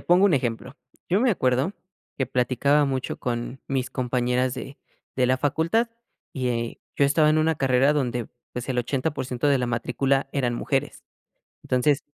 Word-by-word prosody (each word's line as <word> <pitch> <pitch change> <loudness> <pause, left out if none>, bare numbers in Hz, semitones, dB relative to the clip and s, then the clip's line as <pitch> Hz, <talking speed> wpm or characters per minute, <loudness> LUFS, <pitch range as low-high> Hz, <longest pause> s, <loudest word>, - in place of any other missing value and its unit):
pongo 180 +3 +5
un 180 - +3
ejemplo. 125 +1 -2 0.3
Yo 185 - +3
me 255 - +4
acuerdo 130 - +1 0.5
que 135 - +1
platicaba 135 +4 +2
mucho 130 -2 -2
con 120 +2 -3
mis 130 -2 -2
compañeras 125 0 0
de 135 +1 -7 0.4
de 130 -1 +3
la 130 +1 +3
facultad 165 - +1 0.4
y 120 -3 -2 0.2
yo 140 - +3
estaba 150 +2 +4
en 155 - +3
una 155 0 +2
carrera 135 +1 +3
donde, 125 -5 -1 0.2
pues 125 +1 -5
el 130 -2 -1
80% 130 +1 -1
de 140 - +4
la 125 - -1
matrícula 135 +4 0
eran 125 -4 0
mujeres. - - -2 0.6
Entonces 135 +3 +2
130 Hz, 160 wpm, -25 LUFS, 125-145 Hz, 0.6 s, pongo